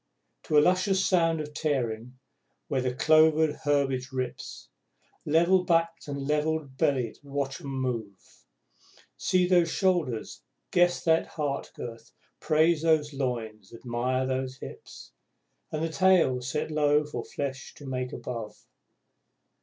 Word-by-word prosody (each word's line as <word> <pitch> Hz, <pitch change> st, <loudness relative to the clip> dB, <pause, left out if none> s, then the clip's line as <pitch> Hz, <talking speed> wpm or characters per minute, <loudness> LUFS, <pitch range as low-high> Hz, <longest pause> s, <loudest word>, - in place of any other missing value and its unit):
To 150 Hz, -, +2 dB
a -, -, +8 dB
luscious 185 Hz, +3 st, +2 dB
sound 165 Hz, -3 st, +2 dB
of 150 Hz, 0 st, -8 dB
tearing, 125 Hz, -5 st, -2 dB, 0.5 s
where 130 Hz, -, 0 dB
the 125 Hz, 0 st, 0 dB
clovered 155 Hz, +3 st, +4 dB
herbage 135 Hz, -3 st, +1 dB
rips, 130 Hz, -, -5 dB, 0.6 s
Level 170 Hz, +4 st, +4 dB
backed 165 Hz, -2 st, 0 dB
and 140 Hz, -1 st, -4 dB
level 150 Hz, +1 st, +1 dB
bellied 130 Hz, -3 st, -1 dB
watch 140 Hz, -1 st, -4 dB
'em -, -, -8 dB
move. 125 Hz, -7 st, -3 dB, 1.0 s
See 180 Hz, -1 st, +2 dB
those 175 Hz, -2 st, +4 dB
shoulders, 170 Hz, -, -1 dB, 0.3 s
guess 175 Hz, 0 st, +3 dB
that 160 Hz, -1 st, +3 dB
heart 145 Hz, -3 st, -3 dB
girth, 115 Hz, -1 st, -9 dB, 0.3 s
praise 155 Hz, +1 st, +3 dB
those 155 Hz, -2 st, +2 dB
loins, 115 Hz, -7 st, -4 dB
admire 125 Hz, +2 st, -1 dB
those 130 Hz, 0 st, -2 dB
hips, -, -, -11 dB, 0.6 s
And 155 Hz, 0 st, -2 dB
the 165 Hz, -, 0 dB
tail 175 Hz, -7 st, +3 dB
set 150 Hz, +5 st, -3 dB
low 150 Hz, 0 st, +3 dB
for 150 Hz, -, -5 dB
flesh 135 Hz, -1 st, -5 dB
to 145 Hz, -, -12 dB
make 130 Hz, -1 st, -3 dB
above! 115 Hz, -4 st, -6 dB
145 Hz, 130 wpm, -28 LUFS, 130-160 Hz, 1.0 s, a